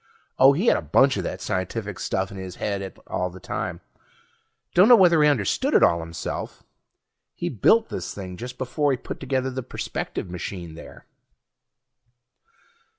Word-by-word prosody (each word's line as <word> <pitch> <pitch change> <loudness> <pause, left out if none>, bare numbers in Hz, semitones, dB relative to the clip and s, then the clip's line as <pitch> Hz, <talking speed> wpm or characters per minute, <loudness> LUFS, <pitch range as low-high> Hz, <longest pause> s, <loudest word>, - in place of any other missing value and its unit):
Oh, 135 +1 +8
he 175 +10 -1
had - - +5
a - - -3
bunch 130 - +3
of 95 - -2
that - - -5
scientific 95 +1 -3
stuff 95 0 -2
in 100 - -8
his 95 -2 -7
head 100 -2 -4
all 90 0 -2
the 90 +1 -12
time; - - -4 0.9
dunno 210 +8 +8
whether 175 -6 +5
he 150 - +6
understood 115 -10 +1
it - - +6
all 85 - +4
himself. 80 0 -6 0.7
He - - -3
built 220 - +3
this - - -5
thing 95 -2 -7
just 125 +5 -8
before 145 +3 0
he 135 - +1
put - - -7
together 130 0 -1
the 130 +1 -4
perspective 120 - -5
machine 90 -1 -6
there. 80 - -12
105 Hz, 160 wpm, -24 LUFS, 90-135 Hz, 0.9 s, Oh